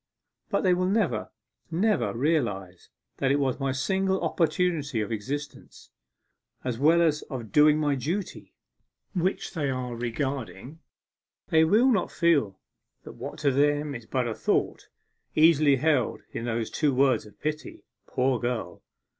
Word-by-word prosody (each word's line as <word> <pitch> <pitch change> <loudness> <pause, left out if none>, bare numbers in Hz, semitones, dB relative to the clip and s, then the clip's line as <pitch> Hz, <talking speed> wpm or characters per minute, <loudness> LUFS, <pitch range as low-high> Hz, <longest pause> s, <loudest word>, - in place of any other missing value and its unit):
But - - +1
they 185 -2 +4
will 180 +1 +1
never, 195 - 0 0.4
never 200 +5 +1
realize 100 - -1 0.3
that 135 - 0
it 140 - +3
was 135 -2 0
my 135 -1 0
single 190 +8 0
opportunity 165 -7 0
of 105 +1 -3
existence, 135 +6 -6 0.7
as 125 -2 -3
well 165 +4 +5
as 155 -2 +1
of 120 -7 -6
doing 150 0 +5
my 150 -2 +1
duty, 165 +9 -4 0.6
which 185 0 -1
they 150 -6 -1
are 125 -2 -3
regarding; 125 - -4 0.7
they 160 -2 +5
will 220 +11 +4
not 210 -6 +1
feel 145 - +1 0.4
that - - -9
what - - -8
to 140 - +3
them 145 +2 +1
is 115 -3 -8
but 130 -2 -1
a 115 - -2
thought, - - -1 0.5
easily 155 -3 +5
held 145 -3 +1
in 115 - -5
those 115 -1 -2
two 145 -4 +1
words 135 -4 +2
of 105 - -19
pity, 155 0 -5 0.2
"Poor 130 -1 0
girl!" 120 -7 -3
145 Hz, 145 wpm, -26 LUFS, 125-160 Hz, 0.7 s, well